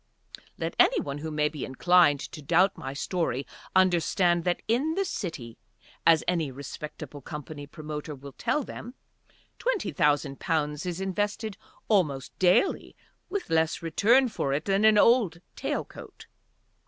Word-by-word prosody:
Let -, -, -3 dB
any -, -, +5 dB, 0.2 s
who 160 Hz, -, -4 dB
may 150 Hz, -1 st, +1 dB
be 150 Hz, -2 st, -6 dB
inclined 145 Hz, +1 st, +4 dB
to 150 Hz, -, -8 dB
doubt 175 Hz, +6 st, +3 dB
my 135 Hz, -, -6 dB
story 140 Hz, -2 st, -2 dB, 0.3 s
understand 175 Hz, -1 st, +3 dB
that 175 Hz, -1 st, 0 dB
in 270 Hz, +9 st, +1 dB
the 390 Hz, +1 st, 0 dB
City, 160 Hz, -, -5 dB, 0.5 s
as 165 Hz, -1 st, +6 dB
any 170 Hz, -5 st, +1 dB
respectable 145 Hz, +1 st, -8 dB
company 150 Hz, +1 st, -8 dB
promoter 150 Hz, 0 st, -6 dB
will 140 Hz, +1 st, -11 dB
tell 255 Hz, -, -1 dB
them, 245 Hz, +1 st, -9 dB, 0.6 s
twenty -, -, -1 dB
thousand 145 Hz, -1 st, +1 dB
pounds 150 Hz, -1 st, -1 dB
is 175 Hz, 0 st, -3 dB
invested 205 Hz, +2 st, -2 dB, 0.3 s
almost 150 Hz, -, +1 dB
daily 185 Hz, -, +2 dB, 0.3 s
with 395 Hz, -, -4 dB
less 160 Hz, +1 st, +1 dB
return 230 Hz, -, +4 dB
for 140 Hz, -, -2 dB
it 150 Hz, +3 st, -1 dB
than 200 Hz, +2 st, +2 dB
an 215 Hz, -1 st, +6 dB
old 210 Hz, -6 st, +4 dB, 0.2 s
tail -, -, -2 dB
coat. -, -, -12 dB
170 Hz, 140 wpm, -27 LUFS, 150-205 Hz, 0.6 s, as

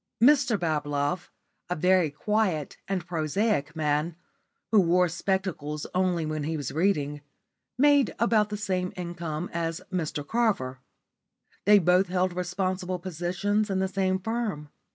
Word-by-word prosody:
Mr 250 Hz, -3 st, +5 dB
Bablove, 145 Hz, 0 st, -1 dB, 0.4 s
a 180 Hz, -, 0 dB
very 180 Hz, 0 st, +3 dB
quiet 185 Hz, -1 st, -1 dB
and 190 Hz, -2 st, -2 dB
prosaic 160 Hz, -1 st, 0 dB
man, 155 Hz, +1 st, 0 dB, 0.6 s
who 220 Hz, -, +6 dB
wore 180 Hz, +1 st, +3 dB
spectacles 170 Hz, -4 st, -2 dB
only 180 Hz, -3 st, +1 dB
when 155 Hz, -1 st, -3 dB
he 160 Hz, +1 st, -2 dB
was 145 Hz, -4 st, -4 dB
reading, 150 Hz, -4 st, 0 dB, 0.6 s
made 285 Hz, -2 st, +4 dB
about 220 Hz, -2 st, +3 dB
the 210 Hz, -, -3 dB
same 185 Hz, -3 st, -1 dB
income 170 Hz, -2 st, -4 dB
as 165 Hz, -1 st, -2 dB
Mr 155 Hz, -5 st, -3 dB
Carver. 195 Hz, -, 0 dB, 0.9 s
They 205 Hz, +1 st, +8 dB
both 180 Hz, +1 st, +4 dB
held 180 Hz, 0 st, 0 dB
responsible 180 Hz, +1 st, -2 dB
positions 185 Hz, +4 st, -1 dB
in 195 Hz, -, 0 dB
the 190 Hz, 0 st, +1 dB
same 190 Hz, 0 st, 0 dB
firm. 205 Hz, -7 st, -3 dB
180 Hz, 135 wpm, -27 LUFS, 155-195 Hz, 0.9 s, They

